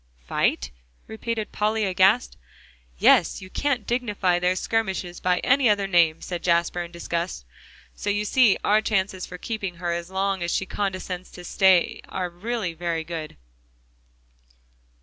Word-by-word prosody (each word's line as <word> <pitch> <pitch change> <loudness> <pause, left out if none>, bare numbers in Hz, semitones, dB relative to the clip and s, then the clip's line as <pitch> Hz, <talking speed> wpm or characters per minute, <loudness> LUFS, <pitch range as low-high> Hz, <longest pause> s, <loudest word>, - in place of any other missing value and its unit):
"Fight?" 65 +1 0 0.3
repeated 220 0 -4
Polly 215 +1 0
aghast. 190 +5 +3 0.6
"Yes; - - +4
you 185 0 -11
can't 285 -3 -1
dignify 210 -7 0
their 180 +1 +1
skirmishes 190 -5 -2
by 180 0 +1
any 265 -2 +4
other 205 -1 +2
name," 170 -4 +3
said 175 -2 -4
Jasper, 170 0 +1
in 170 0 -7
disgust. 170 - -4 0.5
"So 205 - -4
you 205 +1 0
see 235 -2 +4
our 210 +1 +4
chances 190 -4 -1
for 180 - -8
keeping 195 -3 -4
her 170 0 -3
as 170 0 -4
long 190 0 -1
as 170 - -2
she 195 - 0
condescends 185 -2 -4
to 180 - -10
stay 185 0 +3
are 180 -2 -3
really 200 0 -3
very 165 -1 -2
good." 160 -2 -6
185 Hz, 150 wpm, -24 LUFS, 175-210 Hz, 0.6 s, Yes